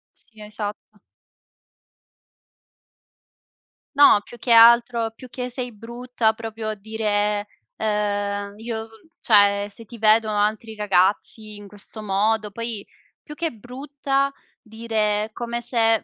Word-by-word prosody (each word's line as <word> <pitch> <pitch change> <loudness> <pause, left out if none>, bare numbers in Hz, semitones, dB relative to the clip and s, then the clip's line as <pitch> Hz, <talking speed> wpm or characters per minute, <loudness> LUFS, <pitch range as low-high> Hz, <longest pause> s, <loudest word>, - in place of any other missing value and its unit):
Sì, 220 -4 -17
esatto. 210 0 -7 3.0
No, 280 -7 +7
più 240 - -13
che 245 - -6
altro, 235 0 +6
più 255 +2 -12
che 250 +1 -5
sei 250 0 -4
brutta, 235 +1 -2
proprio 220 -1 -5
dire, 210 -1 -1 0.3
ehm: 205 -1 -2
"Io 225 0 -5
so 225 - -18
l" 220 - -22
cioè, 205 -2 +4
"se 225 +3 -13
ti 235 +1 -12
vedono 215 0 +4
altri 220 +2 -1
ragazzi 210 +1 0
in 205 0 -11
questo 205 +2 -10
modo" 210 +2 0
poi 230 -1 -4 0.4
più 300 - -11
che 330 +1 -2
brutta 275 +4 -2 0.3
dire 215 -1 -1
come 235 +1 -4
se 225 -2 +2
220 Hz, 120 wpm, -23 LUFS, 210-235 Hz, 3.0 s, No